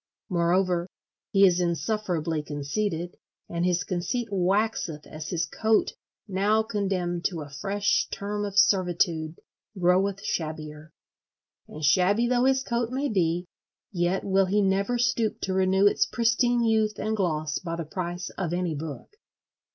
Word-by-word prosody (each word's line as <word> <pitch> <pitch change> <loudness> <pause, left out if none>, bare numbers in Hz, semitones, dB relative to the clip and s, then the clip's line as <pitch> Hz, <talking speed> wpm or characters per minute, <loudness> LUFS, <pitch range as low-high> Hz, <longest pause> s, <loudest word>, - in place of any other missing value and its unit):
Moreover, 175 0 +1 0.4
he 195 0 +6
is 180 -1 +4
insufferably 170 -3 -1
conceited, 160 +5 -3 0.3
and 170 0 -2
his 180 +1 +1
conceit 205 +6 -2
waxeth 190 -4 0
as 155 0 -8
his 165 -2 0
coat, 220 +4 +1 0.3
now 205 +3 +2
condemned 190 -5 -2
to 170 -4 -1
a 145 - -12
fresh 200 +8 0
term 205 +1 -3
of 200 -1 -4
servitude, 175 -5 +2 0.4
groweth 190 +2 +2
shabbier. 155 -1 -4 0.8
And 155 0 -5
shabby 185 - +3
though 250 0 +2
his 265 0 +3
coat 235 -2 -1
may 270 +3 -1
be, 175 -3 0 0.5
yet 175 0 0
will 195 -1 +2
he 205 +2 +2
never 195 +5 +1
stoop 235 -2 0
to 190 - -2
renew 190 +1 +3
its 205 - +4
pristine 240 +1 +2
youth 220 -2 +2
and 215 +1 -1
gloss 155 -7 -1
by 165 -2 -4
the 170 -1 -4
price 175 +2 -4
of 175 -3 -2
any 175 -2 -1
book. 155 - -7
185 Hz, 145 wpm, -26 LUFS, 170-210 Hz, 0.8 s, he